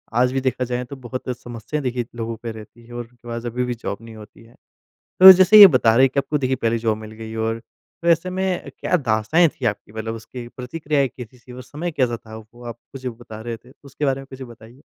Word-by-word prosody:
आज 125 +1 +3
भी 135 - 0
देखा 130 -1 -1
जाए 125 +1 -3
तो 140 - -9
बहुत 130 0 -7
समस्याएँ 120 +5 -6
देखिए 125 -2 -2
लोगों 115 0 -4
पे 115 - -4
रहती 110 +1 -13
हैं 120 - -13
और 120 -1 -6 0.2
थोड़ा-सा 120 0 -5
अभी 125 +2 -2
भी 125 - -2
जॉब 110 -3 -5
नहीं 115 -1 -12
होती 110 +1 -14
है। 115 +1 -20 0.7
तो 190 0 +13
जैसे 190 +3 +6
ये 205 - +14
बता 125 -9 +3
रहे 130 - +6
हैं - - -3
कि 140 - +3
आपको 150 +2 -2
देखिए 130 -1 0
पहली 115 -1 0
जॉब 110 -1 -1
मिल 110 0 -10
गई 110 0 -9
और 115 0 -1 0.4
तो 170 - 0
ऐसे 170 +2 +3
में 185 0 -2
क्या 180 - +1
दास्ताँऐं 130 +6 +2
थी 130 - -5
आपकी 105 -1 -3
मतलब 110 +1 -4
उसकी 120 +2 -9
प्रतिक्रियाएँ 140 +3 -2
कैसी 125 0 -12
थी 125 +1 -14
और 125 +1 -9
समय 155 +7 -5
कैसा 125 -5 0
था? 110 -1 -12
वो 110 +2 -14
आप 120 -1 -7 0.2
मुझे 130 -1 -5
बता 115 -2 -11
रहे 115 0 -5
थे, 125 +3 -20
उसके 140 +2 -5
बारे 135 -1 0
में 135 - -12
कुछ 130 0 -9
बताइए। 120 +3 -15
120 Hz, 245 wpm, -21 LUFS, 115-135 Hz, 0.7 s, ये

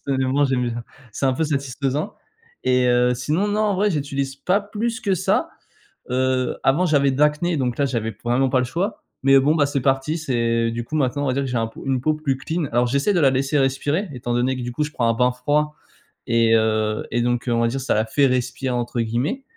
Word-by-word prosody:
Personnellement, 135 +1 +1
j'aime 130 -2 +1
bien. 120 0 -5 0.3
C'est 135 - -1
un 130 - +3
peu 145 +5 -1
satisfaisant 140 +2 -2 0.5
et 125 0 +3
heu, 125 0 +3
sinon, 150 +11 -1
non, 210 +1 0
en 210 -2 +2
vrai, 205 +2 +2
j'utilise 140 -4 -2
pas 190 +8 +1
plus 225 +4 -3
que 200 -5 +1
ça. 185 +1 0 0.6
Heu, 130 0 0
avant, 155 +7 +3
j'avais 140 -3 +3
de 135 - -4
l'acné 150 +3 +2
donc 125 -3 -1
là, 140 - +2
j'avais 115 -4 -2
p 100 - -31
vraiment 125 +2 +1
pas 130 - +2
le 125 - 0
choix 180 - -3 0.2
mais 135 0 +6
bon, 145 +3 +3
bah, 145 -3 +3
c'est 140 -1 -1
parti. 135 +4 0
C'est 115 -6 0
du 120 +1 -4
coup, 155 - -6
maintenant, 145 0 0
on - - 0
va 130 - +1
dire 140 +2 -1
que 135 - -3
j'ai 125 - -1
un 115 0 0
peau 115 - -12
une 130 -2 0
peau 155 +4 +1
plus 140 -4 -1
clean. 160 +4 -3
Alors, 120 +1 +2
j'essaie 140 +11 +1
de 180 - +2
la 140 -4 +5
laisser 135 +2 0
respirer 145 +8 0
étant 120 -1 -4
donné 125 +2 +1
que, 125 - -5
du 120 - -4
coup, 150 - -1
je 150 - -3
prends 120 -5 0
un - - +3
bain 125 +2 +2
froid 150 +4 0 0.5
et 115 -1 +3
heu, 110 -1 +1
et 120 - +1
donc 120 0 0
on 115 -1 +1
va 115 - +3
dire, 135 +3 -3
«ça 130 - 0
la 110 +1 +1
fait 140 +5 +2
respirer,» 130 0 -1
entre 120 0 -2
guillemets 120 - -2
135 Hz, 245 wpm, -22 LUFS, 120-150 Hz, 0.6 s, mais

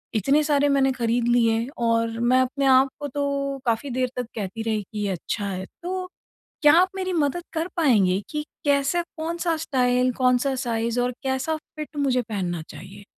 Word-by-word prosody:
इतने 275 +9 +3
सारे 290 -1 +2
मैंने 270 -1 +3
खरीद 240 -1 0
लिए 230 -1 +2
और 230 -1 0
मैं 250 +2 +3
अपने 270 +2 -1
आप 265 0 +5
को 290 - -2
तो 280 0 -2
काफ़ी 235 +4 0
देर 255 0 0
तक 250 - -1
कहती 210 +1 -4
रही 215 -2 -1
कि 210 - -5
ये 195 - -1
अच्छा 195 +4 -3
है। 190 0 -4 0.2
तो 370 +1 -3 0.6
क्या 295 0 +8
आप 370 - +2
मेरी 370 -1 -2
मदद 325 +2 0
कर 325 +2 -1
पाएँगे 205 - +3
कि 300 0 -3 0.2
कैसे 285 +4 +2
कौन-सा 335 +1 -1
स्टाइल 255 -4 +1
कौन-सा 255 +2 +2
साइज़ 230 +1 -1
और 245 - 0
कैसा 265 +4 -1 0.2
फिट 305 0 -7
मुझे 260 -3 +2
पहनना 185 -7 -3
चाहिए? 195 +3 -11
255 Hz, 180 wpm, -24 LUFS, 230-290 Hz, 0.6 s, क्या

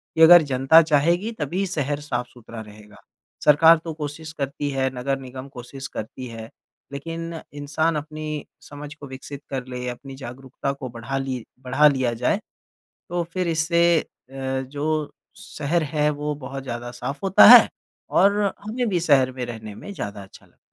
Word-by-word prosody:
कि 160 - +1
अगर 175 +1 +10
जनता 135 +5 +6
चाहेगी 165 +7 +2
तभी 175 +7 -1
शहर 145 -5 -2
साफ़-सुथरा 120 -4 -6
रहेगा। 105 -1 -14 0.5
सरकार 160 +3 +7
तो 165 - -5
कोशिश 155 +1 -6
करती 145 -1 -3
है, 135 -1 0
नगर 135 +2 -2
निगम 130 0 -9
कोशिश 135 +2 -8
करती 125 +3 -7
है, 115 -1 -9 0.4
लेकिन 165 +4 -5 0.3
इंसान 155 +3 0
अपनी 155 0 -5 0.2
समझ 145 0 -9
को 145 -2 -10
विकसित 135 +1 -9
कर 130 -2 -4
ले, 125 -1 -5
अपनी 135 +2 -8
जागरूकता 130 +1 -5
को 135 -2 -7
बढ़ा 120 +3 -5
ली 130 -3 -3 0.2
बढ़ा 145 +4 +4
लिया 130 -4 +1
जाए, 125 - 0 0.7
तो 175 0 -1
फिर 185 -1 -1
इससे 165 +1 +1 0.5
अ, 135 0 -3
जो 145 +3 -2 0.3
शहर 155 +3 -2
है 150 0 +1
वो 150 0 -2
बहुत 135 +1 -6
ज़्यादा 120 -1 -5
साफ 125 +7 -6
होता 195 0 +7
है 240 0 +11 0.4
और 200 +1 +4 0.3
हमें 240 +3 -1
भी 180 -3 +1
शहर 140 -6 +3
में 130 -1 -5
रहने 110 -3 -8
में 205 - -9
ज़्यादा 100 - -6
अच्छा 95 - -16
लगता - - -29
है। - - -43
140 Hz, 170 wpm, -23 LUFS, 130-160 Hz, 0.7 s, है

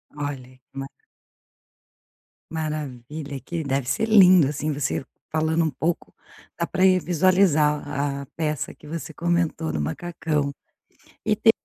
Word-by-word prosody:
Olha 145 -2 -3 0.2
que 130 +1 -19
ma 135 - -4 1.6
maravilha, 150 -2 -4
que 165 +5 -4
deve 135 -2 0
ser 220 - +1
lindo, 185 -7 +7
assim, 150 +2 -2
você 140 -1 -1 0.3
falando 160 +1 +2
um - - +1
pouco 160 +4 -2 0.5
dá 170 - +1
pra 185 - +2
ir 185 -1 +5
visualizar 170 -5 +3 0.3
a - - -7
peça 155 -3 -2
que 150 - -16
você 160 +1 -5
comentou 170 - 0
no 80 - -2
macacão. 150 - -2 0.7
E - - +3
te - - +6
155 Hz, 135 wpm, -24 LUFS, 140-170 Hz, 1.6 s, lindo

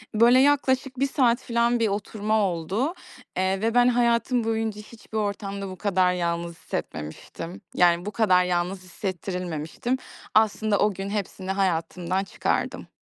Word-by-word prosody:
Böyle 240 +4 +6
yaklaşık 265 -2 +2
1 275 - +3
saat 250 -4 +2
falan 235 0 +1
bir 225 - +3
oturma 210 +1 -1
oldu, 195 - -1 0.4
eee, 190 +1 +1
ve 225 +1 +1
ben, 245 0 +6
hayatım 240 0 +2
boyunca 220 -2 -1
hiçbir 220 0 -9
ortamda 200 -1 -3
bu 185 - -8
kadar 185 -2 +2
yalnız 170 -1 -2
hissetmemiştim. 80 - -6
Yani, 175 0 +4
bu 210 - -3
kadar 185 -5 +4
yalnız 180 +1 -1
hissettirilmemiştim. 180 - -3 0.4
Aslında 215 -1 +3
o 210 -1 +3
gün 195 +2 -5
hepsini 195 -2 -3
hayatımdan 185 0 0
çıkardım. - - -2
200 Hz, 140 wpm, -25 LUFS, 180-230 Hz, 0.4 s, Böyle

